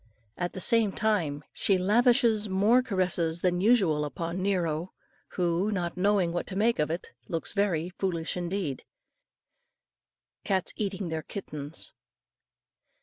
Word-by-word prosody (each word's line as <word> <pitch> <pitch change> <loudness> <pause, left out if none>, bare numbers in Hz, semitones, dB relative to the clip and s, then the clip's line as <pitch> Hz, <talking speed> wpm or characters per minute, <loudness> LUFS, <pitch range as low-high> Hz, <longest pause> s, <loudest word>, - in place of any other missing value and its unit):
At 175 0 -3
the - - -6
same 220 +1 +4
time 165 -10 0
she 195 - +2
lavishes 225 +2 +3
more 205 +7 +4
caresses 180 -7 0
than 180 -1 +1
usual 190 -9 +3
upon 165 +5 -4
Nero, 175 -3 -1 0.4
who, 180 +3 +1
not 175 -4 -2
knowing 190 -2 +2
what 175 - -2
to 190 - -6
make 225 +4 +2
of 150 - +1
it, 165 +2 -4 0.2
looks 165 - -2
very 185 -5 0
foolish 170 -4 -1
indeed. 175 -5 -3 1.6
CATS 190 -4 0
EATING 195 -3 -3
THEIR 160 -1 -2
KITTENS. 150 -4 -3
185 Hz, 130 wpm, -28 LUFS, 165-205 Hz, 1.6 s, same